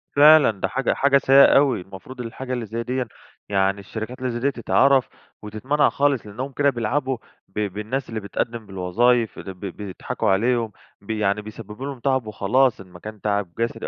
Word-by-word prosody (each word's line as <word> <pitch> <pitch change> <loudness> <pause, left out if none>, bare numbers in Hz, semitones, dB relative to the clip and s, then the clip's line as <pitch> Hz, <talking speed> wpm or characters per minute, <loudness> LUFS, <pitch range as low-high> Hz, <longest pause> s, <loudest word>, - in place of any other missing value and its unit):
فعلًا، 150 -2 +7
ده 95 - 0
حاجة 135 +8 0
حاجة 140 0 +4
سيئة 135 0 +7
أوي. 135 -7 +3
المفروض 95 +7 -10
الحاجة 130 +2 -6
اللي 120 -2 -3
زي 115 +2 -4
ديًا 125 +1 -2 0.4
يعني 95 0 +1
الشركات 110 +5 -7
اللي 130 -1 -2
زي 120 - -4
دي، 140 +3 +1
تتعرف 130 +3 +3 0.3
وتتمنع 125 +8 +1
خالص، 140 -4 +1
لأنهم 125 +7 -6
كده 140 +2 +2
بيلعبوا 130 +2 -1 0.3
ب 95 - -6
بالناس 105 +7 -3
اللي 110 -1 -3
بتقدم 110 +3 -4
بالوظايف، 105 +5 +1
ب 95 - -8
ب 90 -1 -9 0.2
بيضحكوا 100 -3 -3
عليهم، 115 +3 +1 0.3
ب 100 - -20
يعني 105 -1 0
بيسببوا 110 +3 -9
لهم 140 -3 -6
تعب 130 -2 0
وخلاص، 110 +4 +1
إن 95 - -13
ما 90 -1 -14
كان 105 0 -9
تعب 100 -3 -1
جسدي 115 0 -2
115 Hz, 180 wpm, -23 LUFS, 105-130 Hz, 0.4 s, فعلًا